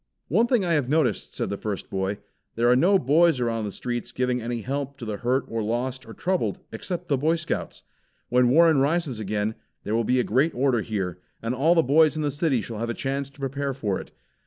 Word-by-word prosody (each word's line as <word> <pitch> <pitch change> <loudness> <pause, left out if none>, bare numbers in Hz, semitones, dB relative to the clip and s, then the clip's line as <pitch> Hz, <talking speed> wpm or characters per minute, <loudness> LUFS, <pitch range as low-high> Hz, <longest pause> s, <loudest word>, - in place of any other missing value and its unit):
"One 220 - +3
thing 235 -6 +2
I 170 - +1
have 145 -5 +1
noticed," 145 -8 0
said - - -2
the 100 - -3
first 105 -3 -4
boy. 95 +1 -1 0.4
"There 115 +1 +2
are - - +6
no 185 +10 +5
boys 160 0 +3
around 115 -2 -1
the 100 - -4
streets 120 +3 -4
giving 125 0 0
any 120 0 -3
help 140 +3 -4
to 120 - -7
the 105 -2 -3
hurt 125 +4 0
or 115 0 -3
lost 120 +3 -2
or 115 - -9
troubled 185 +1 -1
except 180 -1 -5
the 140 -3 +1
Boy 160 +4 +2
Scouts. 165 0 -4 0.4
When 125 0 +3
Warsaw 160 +1 +5
rises 145 -3 +1
again, 105 +1 -1 0.3
there 105 - -3
will 115 +1 +2
be 125 +3 +2
a - - +3
great 135 +9 +1
order 125 -2 +2
here, 95 -6 -3 0.2
and 115 +2 -2
all 155 +7 +3
the 165 - +4
boys 155 +4 +4
in 155 - -1
the 145 - 0
city 145 -4 +1
shall 110 0 -6
have 115 +1 -2
a 115 - -2
chance 140 0 -3
to 140 - -22
prepare 140 0 -2
for 105 -7 -2
it." - - -13
130 Hz, 230 wpm, -25 LUFS, 115-150 Hz, 0.4 s, are